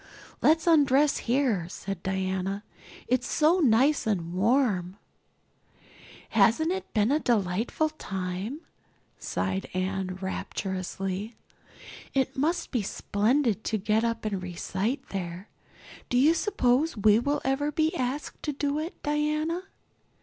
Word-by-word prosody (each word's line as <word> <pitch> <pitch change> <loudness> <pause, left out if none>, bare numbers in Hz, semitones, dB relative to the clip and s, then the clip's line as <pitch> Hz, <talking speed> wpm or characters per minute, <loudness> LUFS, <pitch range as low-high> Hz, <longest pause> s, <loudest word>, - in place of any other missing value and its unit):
"Let's 320 +1 +4
undress 295 -3 +4
here," 235 -10 +1
said 195 -1 -6
Diana. 190 +1 -2 0.4
"It's 245 0 +1
so 320 +4 +3
nice 270 -1 +3
and 175 -5 -1
warm." 200 -3 +1 1.3
"Hasn't 230 - +3
it 380 0 -4
been 215 +3 +3
a 300 - +3
delightful 225 +6 0
time?" 195 - -5 0.6
sighed 190 0 -2
Anne 185 0 -2
rapturously. 190 +2 -4 0.8
"It 265 -1 +1
must 320 +6 0
be 240 - +1
splendid 220 +3 0
to 220 - 0
get 215 +2 +1
up 230 -1 -1
and 200 -3 -2
recite 190 +8 -3
there. 180 0 -5 0.6
Do 245 - +1
you 290 +6 +6
suppose 315 - +1
we 210 +1 +5
will 285 +4 0
ever 275 +2 +1
be 315 +3 +1
asked 260 +2 -3
to 300 - -2
do 285 +1 -1
it, 325 +3 -6
Diana?" 305 +4 0
230 Hz, 120 wpm, -27 LUFS, 195-295 Hz, 1.3 s, you